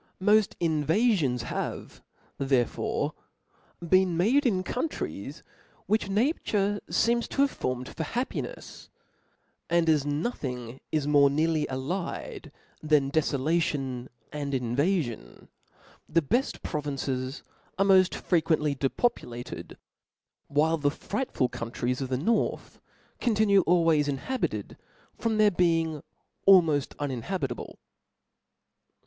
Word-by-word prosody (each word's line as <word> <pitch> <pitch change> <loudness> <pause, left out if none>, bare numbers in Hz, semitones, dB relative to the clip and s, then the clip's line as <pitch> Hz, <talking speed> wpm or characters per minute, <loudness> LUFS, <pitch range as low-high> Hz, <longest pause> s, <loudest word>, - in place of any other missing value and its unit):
Mod 210 +1 +3
invafions 160 - +2
have - - -5 0.4
there 135 -3 +3
fore - - -2 0.7
been 185 -1 +3
made 250 - +3
in 185 -5 +1
countries, 255 +10 -4 0.4
which 215 -2 0
nature 205 -3 +1
feems 235 +1 +2
to 275 - +2
have 280 - +1
formed 125 0 -3
for 160 - -5
happineis: 250 - -5 0.8
and 170 0 +2
as 155 -3 +4
nothing 135 - -3
is 155 -2 0
more 145 -1 +5
nearly 155 +2 +1
allied 145 +8 -4 0.3
than 150 -3 +2
defolation 140 -4 0 0.2
and 145 -1 -4
invafion, 130 - -1 0.6
the 165 +1 +2
bed 240 - +1
provinces 135 -2 -3 0.3
are 195 - +3
moft 190 -2 +4
freq.uently 155 -5 +1
depopulated; 125 - -2 0.7
while 160 +3 +2
the 145 -1 +2
frightful 200 - -2
countries 120 +2 -3
of 130 - -3
the 130 - 0
north 220 - -1 0.4
continue 210 -4 +3
always 165 -4 +4
inhabited, 145 - -3 0.4
from 225 -2 -1
their 210 -1 +5
being 165 -4 +1 0.5
almoft 165 -8 +5
unin 135 -5 -3
habitable. 135 -5 -4
160 Hz, 105 wpm, -27 LUFS, 135-195 Hz, 0.8 s, more